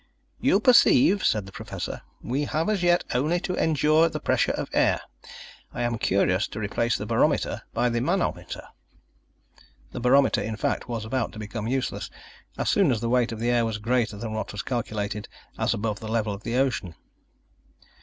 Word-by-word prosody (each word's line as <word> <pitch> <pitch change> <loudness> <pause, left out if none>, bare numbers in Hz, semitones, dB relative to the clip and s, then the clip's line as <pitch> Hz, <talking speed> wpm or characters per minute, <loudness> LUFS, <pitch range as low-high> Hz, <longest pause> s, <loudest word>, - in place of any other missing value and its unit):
"You 255 -7 +3
perceive," 250 - +5
said 105 -3 +1
the 95 - -11
Professor, - - -6 0.2
"we 140 +4 -1
have 160 +6 -1
as 210 -4 0
yet 175 0 +3
only 150 +8 +1
to 180 - -3
endure 155 +1 +3
the - - -4
pressure - - +1
of - - -3
air. - - +3 0.8
I 120 - -1
am 120 -1 -1
curious 95 0 +2
to 110 - -7
replace 110 +3 0
the - - -5
barometer - - +1
by 120 +2 +1
the 120 0 -1
manometer." 130 - -1 1.3
The - - -5
barometer, 135 +3 +4
in 110 - -3
fact, 110 - -2
was 115 -2 -3
about 120 +2 -2
to - - -10
become 105 +1 -5
useless 130 +1 -2 0.5
as - - -2
soon 195 -6 +4
as 120 -4 +1
the 115 +1 -2
weight 125 -1 +2
of 115 - -6
the 120 +1 +1
air 120 -1 +3
was 110 -2 -2
greater 115 -1 0
than 110 +1 -5
what 110 - -3
was 105 - -5
calculated 105 -4 -3 0.3
as - - +1
above 105 -1 -2
the 110 - -7
level 110 -2 0
of 100 - -8
the 115 +2 -3
ocean. 125 -10 0
120 Hz, 185 wpm, -25 LUFS, 110-140 Hz, 1.3 s, perceive